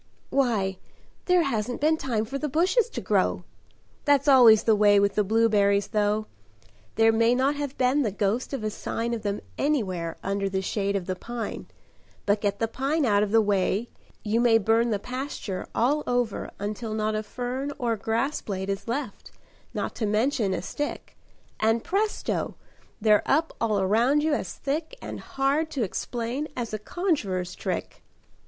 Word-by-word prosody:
"Why, 215 -8 +1 0.5
there 360 -1 +4
hasn't 240 -3 -2
been 310 +2 +3
time 235 -8 -1
for 275 +5 -4
the 300 - -2
bushes 370 - +2
to - - -5
grow. - - +1 0.6
That's 285 -1 +3
always 240 -6 +7
the 220 - +4
way 205 -1 +5
with 200 0 +2
the 210 - +2
blueberries, 205 -2 +3
though: 210 0 +1 0.7
There 225 0 +5
may 230 +2 +3
not 265 +3 +2
have 285 -1 -4
been 260 +3 +3
the 235 - +1
ghost 210 +5 -1
of 270 -6 -4
a 215 - -1
sign 235 +2 -3
Of 230 - -3
them 205 0 -2 0.2
anywhere 190 - -1
under 195 0 -1
the 190 0 -2
shade 200 0 -1
of 190 -3 -2
the 185 0 -2
pine, 235 +3 -6 0.6
But 205 0 +2
get 200 -1 0
the 225 - 0
pine 275 +6 0
out 205 -3 +3
of 210 - +1
the 225 +1 +4
way, 205 +2 0 0.3
you 225 +2 +1
may 235 -2 +5
burn 225 +2 +2
The 210 - +1
pasture 250 -4 -5
all 285 +6 +2
over 245 -4 -1
until 215 +2 -4
not 215 0 0
a 215 - -1
fern 250 +5 -4
Or 235 -4 0
grass 230 +7 -1
blade 190 -1 -4
is 195 +2 -5
left, 240 -2 -4 0.4
not - - -3
to 220 - -1
mention 215 0 +1
a - - -4
stick, 290 0 -5 0.4
And 225 +1 +2
presto, 415 +3 -1 0.4
they're 210 -1 +4
up 315 +4 +1
all 215 -3 +2
around 235 +10 +3
you 310 -1 +2
as - - -2
thick 310 - -3
And - - -7
hard 280 +4 0
to 275 -6 -2
explain 240 +7 -3
as 235 -3 -3
a 215 - -2
conjuror's 205 - -1
trick." - - -4
225 Hz, 175 wpm, -26 LUFS, 205-270 Hz, 0.7 s, always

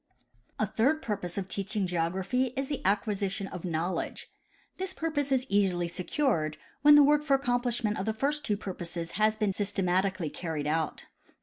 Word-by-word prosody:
A - - +2
third 290 +8 +1
purpose 200 -5 -3
of 190 -2 -2
teaching 200 +1 -2
geography 185 +9 0
is 270 +1 -1
the 285 - -3
acquisition 200 0 0
of 180 -3 -7
knowledge. 170 +1 -3 0.5
This 380 0 -3
purpose 290 -4 -1
is 260 -1 +2
easily 190 -5 +2
secured, 170 - -1 0.2
when 295 +1 +8
the 295 - +9
work 295 +1 +4
for 285 -2 +3
the 270 - -14
accomplishment 245 -4 0
of 190 - -3
the 220 - +1
first 290 +5 0
two 210 - 0
purposes 175 -4 -5
has 215 +2 +2
been 215 -2 0
done - - -6
systematically 190 -4 0
carried 160 -4 -4
out. 155 0 -1
205 Hz, 175 wpm, -29 LUFS, 180-260 Hz, 0.5 s, the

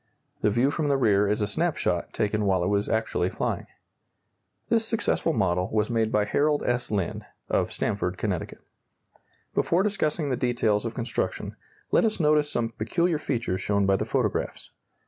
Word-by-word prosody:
The 105 - +3
view 120 +6 +2
from 155 0 -1
the 140 -1 +3
rear 105 -5 +3
is 105 +2 0
a 105 - +1
snap 165 +10 0
shot 85 -1 -1
taken 105 0 0
while 95 -3 +2
it 90 - 0
was 100 0 0
actually 110 -5 0
flying. - - -3 1.0
This 230 -1 +2
successful 225 -6 0
model 90 - +1
was 105 +1 +1
made 115 -1 +1
by 105 -1 +2
Harold 150 +5 +1
S. 120 0 0
Lynn, 100 -5 -2 0.3
of - - +1
Stamford, 95 -3 -2
Conn. 90 -4 -1 1.1
Before 175 +3 +2
discussing 155 -8 0
the - - +2
details 120 -4 +1
of 115 - -6
construction, 120 -2 -3 0.4
let - - +4
us 220 -3 0
notice 150 -2 +3
some 115 -3 0
peculiar 160 +9 0
features 120 -10 -2
shown 100 -1 +1
by 95 0 +4
the - - -1
photographs. - - -2
115 Hz, 170 wpm, -26 LUFS, 100-150 Hz, 1.1 s, let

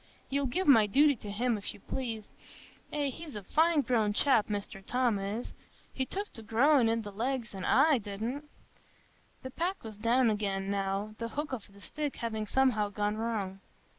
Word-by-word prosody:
You'll 280 0 +1
give 365 +9 -1
my 225 -7 +7
duty 285 +6 +5
to 210 - -8
him, 225 +2 0
if 200 - -6
you - - -14
please. 225 -1 -5 0.6
Eh, 285 -2 0
he's 315 -2 -9
a 205 - -6
fine 320 - +3
growed 220 -6 +1
chap, 260 -6 +3
Mr 205 -1 -4
Tom 245 -2 +1
is; 205 +5 -4 0.4
he 260 -1 -2
took 405 +2 -4
to 225 - -8
growin' 240 +3 +4
i' 225 - +3
the 220 -3 -4
legs, 235 +2 -2
an' 190 -1 -5
I 285 -1 +5
didn't." 230 +8 -5 0.9
The 260 - -6
pack 355 +7 -2
was 220 -2 -8
down 230 +2 +3
again, 195 -2 -1
now, 200 +1 -1
the 230 - -2
hook 290 +4 -4
of 210 -5 -6
the 200 - -16
stick 295 +7 -4
having 220 -2 -3
somehow 245 -6 +2
gone 205 +1 -1
wrong. 210 -4 -2
230 Hz, 185 wpm, -31 LUFS, 205-270 Hz, 0.9 s, my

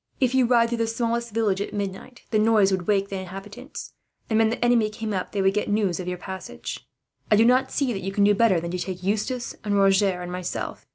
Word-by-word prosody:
If 260 -2 +2
you 260 -2 +4
ride 235 -1 +4
through 235 0 -2
the 230 - +1
smallest 235 0 -1
village 210 -3 0
at 205 - -4
midnight, 200 +5 -5
the 215 - +3
noise 215 -3 +4
would 185 -2 -1
wake 200 -1 +1
the 195 - -4
inhabitants; 195 +8 -9 0.4
and 220 - +3
when 225 0 +4
the 235 +1 -1
enemy 235 -3 +3
came 215 0 -5
up, 185 -2 -3
they 200 -2 -1
would 195 0 +3
get 210 0 -1
news 205 -4 +1
of 180 - -5
your 180 0 -3
passage. 180 - -7 0.4
"I - - +6
do 225 +2 +5
not 255 +2 +3
see 270 -4 0
that 195 - -4
you 195 - -3
can 200 +1 +2
do 205 +1 +5
better 205 -4 +3
than 170 +1 -5
take 180 0 -4
Eustace 215 +5 -2
and 205 -1 0
Roger 195 -1 +3
and 175 - -6
myself. 180 0 -5
205 Hz, 240 wpm, -24 LUFS, 190-230 Hz, 0.4 s, I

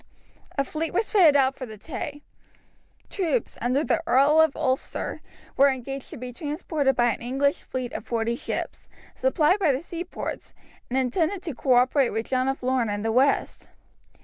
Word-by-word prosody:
A 275 - +3
fleet 320 +4 -4
was 440 - +1
fitted 345 -9 +6
out 270 -1 +3
for 255 - -7
the 215 -1 -10
Tay. 290 +4 -6 0.8
Troops, 390 +5 -1
under 255 +5 +1
the 330 - +1
Earl 295 +3 +5
of 320 -3 +3
Ulster, 260 0 -2 0.3
were 280 +1 +6
engaged 270 +1 -5
to - - -9
be 250 +1 -7
transported 295 -1 -1
by 240 -1 +3
an - - -9
English 270 +4 0
fleet 255 -2 -5
of - - -5
forty 230 0 -1
ships, - - -5 0.2
supplied 375 -6 +2
by 335 -7 +3
the 260 - -1
seaports, 345 +2 -6 0.3
and 255 - -1
intended 320 +9 0
to 325 -5 -4
cooperate 255 +1 +3
with 225 +2 -3
John 255 0 +1
of 270 -1 -2
Lorne 255 -3 +1
in 205 0 -3
the 225 - 0
west. 265 +4 +1
270 Hz, 175 wpm, -25 LUFS, 250-315 Hz, 0.8 s, fitted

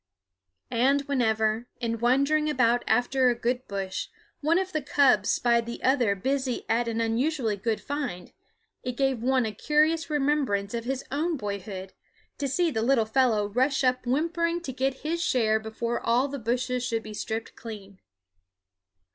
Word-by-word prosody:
And 265 +4 +3
whenever, 220 -4 0
in 230 -1 -2
wandering 280 +6 +2
about 245 -4 +2
after 250 +3 +3
a 240 - +1
good 245 +2 -2
bush, 195 -1 -3 0.3
one 315 +3 +2
of 375 0 -1
the 310 - 0
cubs 280 -1 +3
spied 235 -1 +2
the 235 - -6
other 250 -6 +3
busy 260 +4 -1
at 235 +1 +1
an 230 0 -2
unusually 230 +1 0
good 215 +2 -1
find, 280 -12 -4 0.5
it 250 -1 -5
gave 270 -4 +1
one 255 0 +2
a 220 - -2
curious 310 +8 +1
remembrance 275 -9 0
of 230 0 -3
his 265 +1 -2
own 315 +3 0
boyhood 200 -3 -5 0.5
to 285 - -1
see 335 +5 +1
the 220 -5 -1
little 235 -1 +3
fellow 220 -2 +2
rush 260 +7 +1
up 255 -1 +1
whimpering 335 +5 0
to 270 -6 -6
get 265 +1 -1
his 335 +2 -1
share 220 -7 +2
before 220 +2 -3
all 245 +4 +2
the 280 0 -5
bushes 250 +2 -1
should 225 -2 -1
be 215 - -8
stripped 220 +2 -4
clean. 200 -4 -9
250 Hz, 165 wpm, -27 LUFS, 225-280 Hz, 0.5 s, And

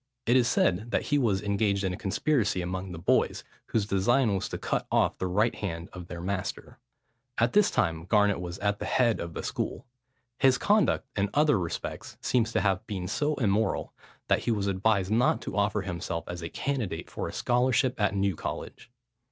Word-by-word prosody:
It 120 - +3
is 125 -2 +4
said 105 -1 +1
that - - 0
he 145 - +1
was 105 -6 +1
engaged 100 -1 +1
in 95 -1 0
a - - -3
conspiracy 105 -1 0
among 95 +1 -4
the 90 - -6
boys, 85 - +1 0.2
whose 110 -3 0
design 110 +4 +2
was 95 - -2
to - - -4
cut - - -2
off - - +2
the 95 - -1
right 105 +6 +2
hand 85 -4 -5
of 90 -2 -8
their 85 -1 -7
master. 95 0 -4 0.6
At 120 +1 +2
this 210 -1 +5
time 80 -2 0
Garnet 105 -1 +3
was 90 +1 -5
at 100 0 -1
the - - -4
head 120 -3 +2
of 85 -1 -6
the - - -4
school. - - -3 0.5
His 130 -2 +5
conduct 210 -6 +2
in 100 0 +1
other 150 -6 +4
respects 85 -2 -5
seems 115 -2 +1
to - - +2
have 100 +2 0
been 95 -4 -4
so 150 +9 0
immoral, 110 -4 0 0.3
that - - +3
he - - 0
was 105 -4 +1
advised 100 0 +1
not 125 +8 +3
to - - -5
offer 105 0 +1
himself 85 -2 -4
as 90 0 -6
a 85 - -5
candidate 115 -12 -3
for - - -5
a - - -5
scholarship 125 0 +1
at 100 -1 +2
New 100 -2 +1
College. 115 - -6
100 Hz, 200 wpm, -28 LUFS, 95-120 Hz, 0.6 s, this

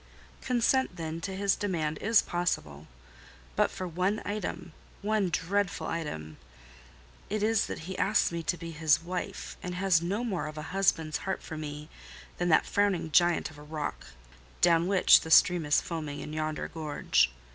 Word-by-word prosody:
"Consent, 250 -3 +1
then, 165 -1 -5
to 190 +2 -4
his 200 0 +2
demand 160 -6 -2
is 225 +1 +4
possible: 80 - -2 0.7
but - - +3
for 185 - -5
one 185 +5 0
item—one 200 +1 -3
dreadful 195 +3 -1
item. 80 - -5 0.9
It 210 0 -1
is—that 220 -6 0
he 190 +1 -5
asks 205 -2 +2
me 170 0 -3
to 175 +2 -1
be 165 0 -7
his 155 0 +2
wife, 180 +1 -5
and 180 0 -5
has 185 -3 +3
no 195 +7 -2
more 185 -10 -2
of 155 0 -8
a 155 - -5
husband's 165 -5 +1
heart 190 -1 -4
for 160 - -7
me 150 -1 -6 0.5
than 175 0 +1
that 160 - +5
frowning 200 -5 0
giant 175 0 +3
of 150 - -14
a - - -11
rock, 150 0 -5 0.5
down 170 0 +4
which 190 -2 +6
the 160 - -7
stream 170 -1 +5
is 145 - +4
foaming 155 -4 -5
in 150 - -7
yonder 155 0 -2
gorge. 155 - +1
170 Hz, 165 wpm, -29 LUFS, 155-195 Hz, 0.9 s, which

